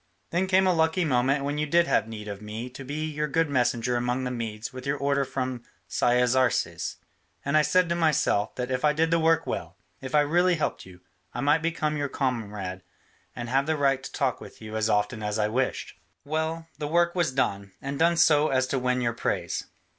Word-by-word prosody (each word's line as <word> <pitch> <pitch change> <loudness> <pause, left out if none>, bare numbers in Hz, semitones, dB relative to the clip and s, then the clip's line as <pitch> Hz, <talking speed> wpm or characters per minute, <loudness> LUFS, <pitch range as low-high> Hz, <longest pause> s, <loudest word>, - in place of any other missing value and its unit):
Then 180 +3 +1
came 190 0 +4
a 185 - +4
lucky 160 +2 +2
moment 135 0 +2
when 145 +1 -2
you 150 - 0
did 170 +3 +4
have 110 -9 +1
need 105 -2 -7
of 100 -1 -6
me 110 +4 -6
to 135 - -9
be 150 +4 -3
your 150 -1 -2
good 160 +1 +1
messenger 125 -2 +1
among 125 +2 -1
the 125 - -2
Medes 115 -1 -5
with 130 0 -8
the 140 - +1
order 140 0 +1
from 130 -2 -3 0.3
Cyaxares, 125 +1 +1 0.5
and 140 +2 0
I 155 - +7
said 175 +4 +3
to - - +2
myself 155 -11 +1
that 125 +1 -3
if 130 +2 -1
I 150 0 +4
did 160 +2 +1
the 165 - +3
work 165 0 +3
well, 85 +2 -4 0.2
if 135 +2 -4
I 150 - +6
really 175 +5 +3
helped 155 - -3
you, 90 -1 -15 0.3
I 120 - -2
might 145 +3 +3
become 155 -2 -1
your 145 -1 -2
comrade 105 -9 -3 0.5
and 120 -1 -5
have 135 +4 +1
the 160 -1 +1
right 135 -2 +2
to - - -8
talk - - -1
with - - -12
you 110 0 -8
as 110 0 0
often 105 +2 0
as 105 0 -2
I 105 -1 +2
wished. 125 +4 -2 0.3
Well, 160 +2 -2
the 150 - -2
work 170 +2 +2
was 170 -6 +1
done, 100 -7 -1
and 140 +1 -5
done 170 +1 +3
so 155 -2 +5
as 130 -2 +2
to 135 - 0
win 125 0 0
your 120 -1 0
praise. 90 -6 -2
135 Hz, 220 wpm, -26 LUFS, 120-155 Hz, 0.5 s, I